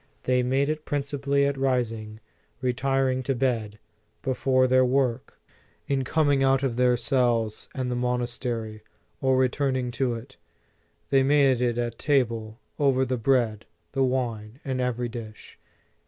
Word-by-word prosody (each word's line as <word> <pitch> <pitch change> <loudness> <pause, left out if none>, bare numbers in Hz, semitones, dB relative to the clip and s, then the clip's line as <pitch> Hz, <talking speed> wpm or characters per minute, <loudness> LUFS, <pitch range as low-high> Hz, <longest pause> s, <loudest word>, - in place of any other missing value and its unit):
They 125 0 +2
made 135 +3 +1
it 155 0 -2
principally 140 -1 0
at 140 -1 -1
rising, 115 -5 -1 0.4
retiring 130 +1 0
to 135 +1 -1
bed, 115 -5 -1 0.5
before 130 -1 +2
their 130 0 +4
work, 130 -1 0 0.5
in 135 -1 0
coming 145 0 +2
out 135 0 +3
of 130 -4 0
their 125 0 +3
cells 120 -4 0
and 130 -2 -2
the - - -1
monastery, 120 -3 -2 0.4
or 130 -1 +3
returning 130 0 +1
into 125 0 -1
it; 120 +4 -10 0.7
they 135 -1 +5
made 135 -2 +3
it 120 -1 +1
at 120 -1 -3
table, 115 -6 0 0.2
over 135 -2 +3
the 130 0 -1
bread, 115 -3 +1 0.2
the 135 -1 +1
wine 120 -3 -2
and 130 -2 -2
everv 125 -1 -1
dish." 110 -2 -10
130 Hz, 140 wpm, -26 LUFS, 120-135 Hz, 0.7 s, they